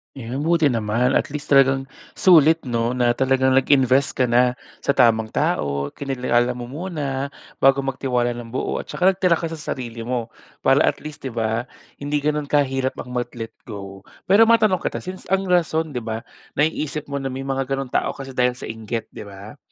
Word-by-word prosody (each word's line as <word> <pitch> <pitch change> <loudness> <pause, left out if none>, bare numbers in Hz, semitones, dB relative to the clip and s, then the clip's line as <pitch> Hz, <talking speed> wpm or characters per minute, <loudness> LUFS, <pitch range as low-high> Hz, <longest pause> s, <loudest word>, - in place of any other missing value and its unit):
Yun, 135 +3 -4
buti 165 -3 +3
naman. 115 +2 +1
At - - +2
least, 150 +1 -5
talagang 135 -1 +4 0.2
sulit 165 -3 +5
'no, 120 -1 -1
na 120 -1 +2
talagang 130 0 +3
nag-invest 135 0 +3
ka 125 -2 +1
na 125 +1 +4 0.2
sa 140 - 0
tamang 115 -4 +4
tao. 70 -8 -1
Kinilala 125 -3 0
mo 120 0 -7
muna, 145 -4 -3 0.3
bago 135 0 +4
magtiwala 125 -2 -1
ng 120 -1 -6
buo, - - -1
at - - -7
tsaka 185 +2 +2
nagtira 185 -2 +2
ka 165 0 -3
sa 165 - -6
sarili 120 -6 -5
mo. 120 -2 -2 0.3
Para, 135 +3 +4
at - - -1
least 150 -2 -8
'di 130 - -5
ba, 115 +1 -1 0.3
hindi 145 0 -2
ganun 150 0 0
kahirap 135 -2 +1
ang 125 - -8
mag-let 120 -2 -4 0.2
go. 100 -3 -9 0.2
Pero 215 +4 +7
matanong 220 -5 +4
kita, - - -3
since, 185 0 -8
ang 195 0 0
rason 160 -2 +1
'di 125 - -3
ba, 110 0 -4 0.3
naiisip 150 -1 -1
mo 140 - -2
na 135 - -5
may 135 0 -4
mga 135 0 -2
ganong 135 -2 -4
tao - - 0
kasi, 135 -1 -8
dahil 125 -1 +1
sa 125 - -7
inggit 110 0 -5
'di - - -9
ba? 100 +6 -11
135 Hz, 190 wpm, -22 LUFS, 120-150 Hz, 0.3 s, Pero